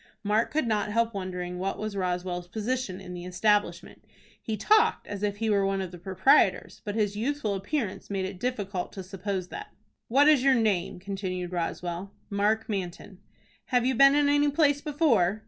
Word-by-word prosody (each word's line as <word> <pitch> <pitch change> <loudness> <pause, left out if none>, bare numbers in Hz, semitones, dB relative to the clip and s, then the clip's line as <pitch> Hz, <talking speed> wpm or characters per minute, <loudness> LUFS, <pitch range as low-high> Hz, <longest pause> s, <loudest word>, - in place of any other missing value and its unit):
Mark 215 +2 +1
could 310 -3 0
not 215 -2 0
help 230 +1 +1
wondering 180 -2 -4
what 195 +1 -2
was 215 -1 -4
Roswell's 180 -1 -2
position 220 0 -3
in 180 - -9
the 175 -1 -7
establishment. 205 +4 0 0.4
He 220 -1 -3
talked 435 - +3
as 200 -1 -6
if 205 -1 -1
he 225 +1 -2
were 200 -2 +3
one 195 0 0
of 185 -2 -4
the 175 - -10
proprietors; 190 +8 +2
but 205 -2 -4
his 205 -2 0
youthful 230 -1 -1
appearance 205 +2 -3
made 195 -2 -1
it 190 -1 -7
difficult 205 -7 -3
to 190 - -6
suppose 190 0 -4
that. 420 0 -9 0.3
"What 280 +5 +4
is 300 -4 +5
your 270 -1 +5
name?" 205 -7 0
continued 185 -2 -4
Roswell. 175 +2 -4 0.2
"Mark 210 +2 +1
Manton." 190 -1 -5 0.5
"Have 245 -2 +1
you 260 - +2
been 275 +3 +6
in 290 -1 +3
any 290 0 +3
place 285 -1 +2
before?" 265 - +2
205 Hz, 180 wpm, -27 LUFS, 185-245 Hz, 0.5 s, been